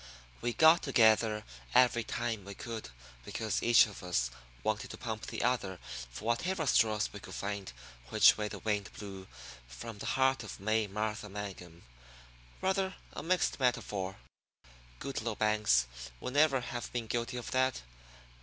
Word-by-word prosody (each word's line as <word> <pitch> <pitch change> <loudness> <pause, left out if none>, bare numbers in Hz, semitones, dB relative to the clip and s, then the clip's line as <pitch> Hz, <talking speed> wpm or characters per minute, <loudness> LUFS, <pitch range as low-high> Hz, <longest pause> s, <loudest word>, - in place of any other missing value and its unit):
We 120 0 0
got 160 +4 +7
together 110 -4 +4 0.3
every 120 -2 +5
time 115 -2 -2
we 100 +1 -8
could 115 - -6 0.3
because 110 - -2
each 120 -2 +7
of 105 -3 -9
us 75 -10 0 0.3
wanted 110 0 -1
to - - -7
pump 110 -3 -5
the - - -3
other 115 -7 0 0.3
for 60 - -9
whatever 160 +9 0
straws 110 -5 +3
we 105 - -7
could - - -10
to - - -5
find 100 -3 -4 0.4
which - - +7
way 105 -1 -2
the - - -6
wind 105 -2 -1
blew 95 -2 -8 0.4
from 100 - -8
the - - -5
heart 130 0 +3
of 110 - -8
May 110 +2 +1
Martha 105 +1 -3
Mangum 95 -4 -7 0.8
rather 190 0 0 0.2
a - - -5
mixed 180 -2 +1
metaphor; 105 -7 0 0.8
Goodloe 120 -5 -3
Banks 105 - +3 0.3
would 125 - -5
never 145 -3 +4
have 120 -1 -5
been 120 -2 -2
guilty 120 +3 -2
of 120 - -6
that. 130 - +1
110 Hz, 155 wpm, -32 LUFS, 100-125 Hz, 0.8 s, got